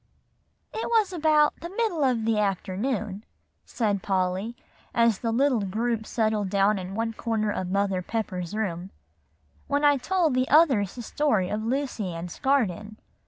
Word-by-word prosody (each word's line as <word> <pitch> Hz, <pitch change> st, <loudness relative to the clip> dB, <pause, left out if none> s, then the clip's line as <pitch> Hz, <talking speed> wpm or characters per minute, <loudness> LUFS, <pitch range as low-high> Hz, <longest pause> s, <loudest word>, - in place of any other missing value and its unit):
"It 445 Hz, -, -3 dB
was 440 Hz, -5 st, +2 dB
about 305 Hz, -3 st, +3 dB
the 340 Hz, -, -7 dB
middle 390 Hz, -6 st, -1 dB
of 245 Hz, -4 st, +1 dB
the 225 Hz, -1 st, +2 dB
afternoon," 205 Hz, +2 st, -2 dB, 0.4 s
said 205 Hz, -5 st, -1 dB
Polly, 190 Hz, +4 st, -1 dB, 0.4 s
as 230 Hz, -3 st, +3 dB
the 230 Hz, -, -1 dB
little 255 Hz, -1 st, +2 dB
group 220 Hz, +3 st, -2 dB
settled 215 Hz, -3 st, 0 dB
down 200 Hz, +1 st, +2 dB
in 185 Hz, +1 st, -6 dB
one 225 Hz, +1 st, -1 dB
corner 220 Hz, -2 st, -1 dB
of 185 Hz, -3 st, -3 dB
Mother 195 Hz, -1 st, 0 dB
Pepper's 185 Hz, -3 st, -4 dB
room, 185 Hz, -4 st, -3 dB, 0.8 s
"when 285 Hz, +1 st, +1 dB
I 290 Hz, -1 st, +5 dB
told 335 Hz, +2 st, +1 dB
the 255 Hz, +1 st, +1 dB
others 265 Hz, -, +4 dB
the 240 Hz, -, -6 dB
story 220 Hz, -8 st, 0 dB
of 215 Hz, +1 st, -2 dB
Lucy 230 Hz, -7 st, -2 dB
Ann's 170 Hz, +1 st, -7 dB
Garden. 215 Hz, -6 st, 0 dB
220 Hz, 155 wpm, -26 LUFS, 195-270 Hz, 0.8 s, I